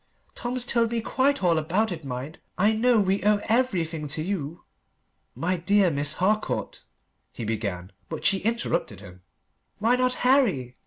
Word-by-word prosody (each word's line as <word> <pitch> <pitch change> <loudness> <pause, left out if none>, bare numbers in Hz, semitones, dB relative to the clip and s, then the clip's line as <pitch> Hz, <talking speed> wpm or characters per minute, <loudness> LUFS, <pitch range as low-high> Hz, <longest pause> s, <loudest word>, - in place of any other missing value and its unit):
"Tom's 245 0 -3
told 235 -2 +1
me 235 0 -1
quite 265 +1 0
all 170 -3 +3
about 185 +8 0
it, 165 -3 -6
mind! 135 +3 -6 0.2
I 210 +4 +3
know 235 +1 +3
we 195 0 +1
owe 210 0 +3
everything 175 -11 0
to 155 +2 -3
you." 170 -4 -4 0.7
"My 180 +2 -1
dear 195 +1 +3
Miss 145 +1 +1
Harcourt," 210 +5 -1 0.5
he 115 - -6
began. 100 -5 -3 0.2
But - - -6
she 195 - +4
interrupted 225 - -2
him. 90 -2 -13 0.6
"Why 230 +4 +2
not 255 0 +1
Harry?" 200 - +2
190 Hz, 155 wpm, -25 LUFS, 150-230 Hz, 0.7 s, she